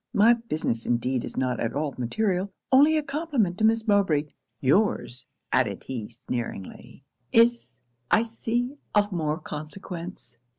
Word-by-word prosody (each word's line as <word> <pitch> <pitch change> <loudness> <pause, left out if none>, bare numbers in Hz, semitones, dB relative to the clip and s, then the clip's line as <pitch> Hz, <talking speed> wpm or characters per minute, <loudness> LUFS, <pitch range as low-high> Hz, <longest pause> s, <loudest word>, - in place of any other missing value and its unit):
My 220 +4 +7
business 155 - -2
indeed 120 +1 0
is - - -7
not 125 -2 0
at 115 - -2
all 145 -1 -1
material 190 - -1 0.2
only 295 +4 +6
a 305 - 0
compliment 275 - -1
to - - 0
Miss 225 +1 +3
Mowbray 195 -8 +3 0.4
your's,' 135 - +1 0.3
added 115 -7 +1
he 120 -5 -5
sneeringly, 120 0 -6 0.3
'is, 230 - +3 0.3
I 220 - +4
see, 240 +3 -2 0.2
of 205 0 +3
more 155 -4 -1
consequence.' 165 - -8
180 Hz, 135 wpm, -26 LUFS, -, 0.4 s, My